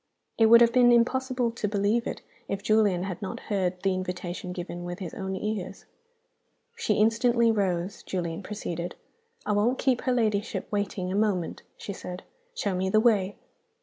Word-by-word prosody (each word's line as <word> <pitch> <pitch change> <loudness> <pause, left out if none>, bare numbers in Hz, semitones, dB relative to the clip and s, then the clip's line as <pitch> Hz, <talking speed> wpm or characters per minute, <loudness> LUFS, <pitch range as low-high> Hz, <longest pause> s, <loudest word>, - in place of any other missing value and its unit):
It 225 - +6
would 235 +1 +8
have 235 -1 +5
been 245 -1 +6
impossible 250 0 +2
to 230 -2 -3
believe 205 +3 +1
it, - - -5 0.2
if 200 0 -3
Julian 205 -4 +3
had 185 -3 -5
not 195 - -5
heard 185 -2 0
the 195 -1 +2
invitation 180 -1 -4
given 175 -1 -6
with 175 0 -5
his 185 -4 -6
own 190 0 -4
ears. 200 -1 -4 0.9
"She 460 0 0
instantly 230 +2 +3
rose," 190 -2 -1
Julian 170 -2 -3
proceeded. 175 -4 -5 0.5
"'I - - 0
won't 215 +5 +2
keep 255 -2 +1
her 255 - 0
ladyship 220 -3 0
waiting 200 -3 -2
a - - -1
moment,' 200 -5 0 0.2
she 200 - -6
said; 180 -1 -7 0.3
'show 200 - -1
me 185 +1 0
the 215 - +4
way. 205 -4 +2
205 Hz, 170 wpm, -27 LUFS, 185-230 Hz, 0.9 s, would